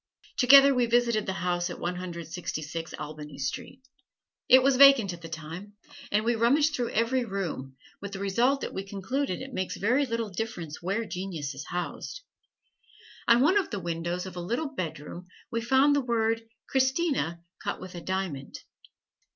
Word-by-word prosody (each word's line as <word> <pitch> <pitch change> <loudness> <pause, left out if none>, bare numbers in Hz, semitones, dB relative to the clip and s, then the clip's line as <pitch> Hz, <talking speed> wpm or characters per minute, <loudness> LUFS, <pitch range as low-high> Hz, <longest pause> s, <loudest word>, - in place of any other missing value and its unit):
Together 275 +2 +8
we 250 -2 +2
visited 235 -2 +2
the 190 - 0
house 175 0 0
at - - -6
One 180 +1 -2
Hundred 175 -2 -6
Sixty 165 -2 -4
six 165 +2 -5
Albany 150 -1 -8
Street. 200 - -5 0.6
It 260 0 +8
was 275 0 +4
vacant 260 -8 +7
at 170 - -10
the 165 - -8
time, 165 +6 -7 0.4
and 210 +2 +2
we 240 - +3
rummaged 280 +7 +3
through 245 -4 -1
every 245 +3 +1
room, 175 - -4 0.2
with 200 0 -6
the 195 - -5
result 235 +8 +2
that - - -4
we 190 - -3
concluded 195 +4 -3
it 265 0 -9
makes 185 -4 -3
very 250 +7 +2
little 230 -3 -2
difference 180 -6 -5
where 200 +6 -1
genius 180 -7 -4
is 135 +3 -8
housed. 180 - -4 1.1
On 235 +1 +6
one 365 +9 +5
of 385 - -3
the 205 - -3
windows 170 +1 -3
of 185 -2 -8
a 175 - -4
little 250 - -2
bedroom 170 - -6 0.2
we 230 - -1
found 265 +4 +4
the 285 - +2
word 225 -2 +1 0.3
"Christina" 265 - 0 0.2
cut - - -2
with 185 -1 -9
a 175 - -7
diamond. 185 -7 -3
200 Hz, 175 wpm, -28 LUFS, 175-250 Hz, 1.1 s, Together